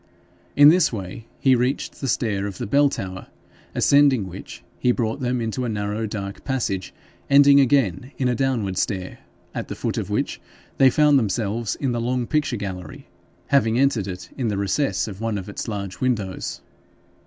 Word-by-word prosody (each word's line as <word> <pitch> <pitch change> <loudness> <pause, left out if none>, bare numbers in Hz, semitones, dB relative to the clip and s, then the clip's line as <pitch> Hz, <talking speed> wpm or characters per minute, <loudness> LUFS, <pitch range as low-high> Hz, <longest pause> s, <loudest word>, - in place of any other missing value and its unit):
In 145 +1 +9
this 180 +3 +4
way 110 +1 -7
he 130 -2 +4
reached 125 +3 -2
the 135 - -2
stair 105 -5 0
in 100 - -5
the - - -4
bell 140 +6 +4
tower, 95 -6 -6 0.5
ascending 140 -7 +4
which 95 +1 -10 0.2
he 125 - +3
brought 120 +2 -1
them 125 -1 -1
into 115 +2 -2
a 120 - -2
narrow 105 +1 -2
dark 100 -2 -6
passage 115 -9 -2 0.4
ending 140 0 +7
again 130 -4 +2
in 130 - 0
a 125 - +2
downward 115 -7 -1
stair, 95 -3 -3 0.3
at - - -4
the - - -6
foot - - -2
of - - -5
which - - -2 0.4
they 135 - +7
found 150 +1 +4
themselves 110 -1 -1
in 135 -3 -2
the 120 -1 -1
long 125 +1 -1
picture 150 -2 0
gallery, 95 -3 -7 0.4
having 115 -5 +3
entered 125 -7 +2
it 90 -2 -7
in 125 -4 -2
the 105 -2 -1
recess 100 -1 0
of 100 -1 -8
one 115 -2 -1
of 95 - -6
its 105 - -6
large 100 -3 -5
windows. 110 -7 -2
115 Hz, 180 wpm, -23 LUFS, 100-135 Hz, 0.5 s, In